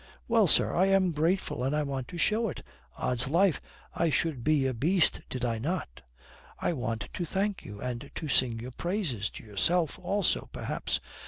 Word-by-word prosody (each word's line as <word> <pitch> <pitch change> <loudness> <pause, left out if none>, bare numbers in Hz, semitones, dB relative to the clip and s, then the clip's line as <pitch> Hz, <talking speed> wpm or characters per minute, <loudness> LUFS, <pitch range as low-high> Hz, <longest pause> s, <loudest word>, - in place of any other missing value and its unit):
Well, - - +4
sir, - - +4
I 185 +3 +4
am 195 -2 +3
grateful, 160 -3 0
and 135 +3 0
I 150 - +1
want 135 -3 -3
to 175 - -8
show 215 +6 +2
it. - - -7 0.3
Odds 125 +1 +2
life, 175 +4 +3 0.3
I 170 - +1
should 150 -5 0
be 150 -2 +3
a 130 - +1
beast 160 +9 +2
did 125 -1 -2
I 115 -2 -1
not. 140 - -3 0.6
I - - 0
want 115 -6 -3
to 180 - -3
thank 195 +4 -1
you 105 0 -9
and 125 +2 -4
to 155 - -4
sing 125 -4 +2
your 125 +3 -6
praises 165 - -2
to - - -11
yourself 155 - +1
also 200 -3 0
perhaps. - - -2
150 Hz, 185 wpm, -29 LUFS, 125-180 Hz, 0.6 s, Well